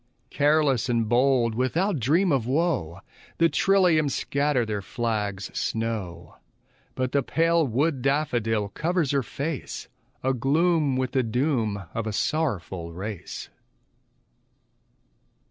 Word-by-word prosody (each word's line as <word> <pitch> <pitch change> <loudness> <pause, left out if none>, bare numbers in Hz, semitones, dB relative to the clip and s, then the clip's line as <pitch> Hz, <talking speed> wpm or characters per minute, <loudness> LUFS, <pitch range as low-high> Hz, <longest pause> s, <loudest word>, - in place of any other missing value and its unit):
Careless 145 -4 +2
and 115 -2 +1
bold, 120 0 +3
without 160 - 0
dream 165 - +2
of 130 -5 +1
woe, 130 - 0 0.4
The 165 0 +4
trilliums 165 -4 +3
scatter 140 -3 0
their 105 -2 -3
flags 105 -2 -3
snow; 95 -8 -3 0.6
But 130 -1 -1
the 140 - +2
pale 165 +3 +2
wood 135 +3 0
daffodil 120 -7 0
covers 165 - 0
her 140 -1 +2
face, 140 +5 -5 0.3
Agloom 140 +3 +2
with 130 -1 -1
the 130 - +2
doom 115 -4 0
of 115 -1 -3
a 110 - -2
sorrowful 95 - -2
race. 95 +2 -6
130 Hz, 110 wpm, -25 LUFS, 110-155 Hz, 0.6 s, The